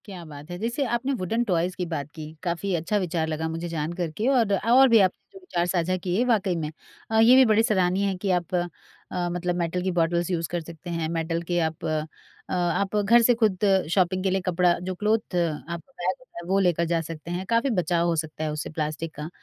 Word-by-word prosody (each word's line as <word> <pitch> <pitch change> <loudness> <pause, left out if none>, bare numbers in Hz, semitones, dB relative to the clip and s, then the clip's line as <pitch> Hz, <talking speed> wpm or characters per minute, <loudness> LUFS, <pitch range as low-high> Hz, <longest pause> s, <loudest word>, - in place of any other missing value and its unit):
क्या 190 -4 -8
बात 150 +1 -10
है! 175 - -4
जैसे 235 +6 -1
आपने 260 +4 -1
वुडन 225 +2 -1
टॉयज़ 180 -4 0
की 180 - -2
बात 160 -5 -4
की 155 -1 -8
काफ़ी 180 +2 -1
अच्छा 170 +6 0
विचार 170 -4 -1
लगा 160 0 -2
मुझे 165 +2 -4
जान 160 -1 -2
कर 175 -2 -3
के। 220 - 0
और 240 -7 +3 0.2
और 265 +3 +7
भी 230 -1 +7
आपने 190 -2 0
जो 385 - -11
विचार 175 - -2
साझा 180 0 0
किए 185 +5 0
वाक़ई 205 -7 +2
में 155 -2 -3 0.4
अ, 220 - +3
ये 230 +3 +7
भी 260 0 +7
बड़े 220 -1 +4
सराहनीय 190 -3 +2
है 195 - -1
कि 190 +1 -1
आप 175 +1 -4
अ, 175 0 +1 0.7
मतलब 175 0 -1
मेटल 175 +1 -1
की 190 - 0
बॉटल्स 170 +1 +1
यूज़ 165 -2 -1
कर 175 -1 -1
सकते 170 +2 -10
हैं। 165 -2 -2
मेटल 165 0 -1
के 175 - +2
आप 160 -1 -2
अ, 155 -1 -1 0.5
आप 180 +3 0
घर 210 +3 +5
से 245 +1 +5
खुद 220 -6 +1 0.3
शॉपिंग 185 -1 +2
के 195 - +2
लिए 190 +1 0
कपड़ा 180 0 +3 0.2
जो 185 - -3
क्लॉथ 215 0 0
आपका 170 - -3
बैग 185 -6 -2
होता 255 - -18
है - - -11
वो 195 +1 +3
लेकर 175 -3 +2
जा 165 0 0
सकते 165 +1 -7
हैं, 180 +2 -3
काफ़ी 235 +4 +2
बचाव 175 -5 +1
हो 170 - +1
सकता 155 0 -4
है 155 - -1
उससे 150 0 -4
प्लास्टिक 155 +1 -4
का। 150 +2 -6
175 Hz, 235 wpm, -25 LUFS, 165-200 Hz, 0.7 s, और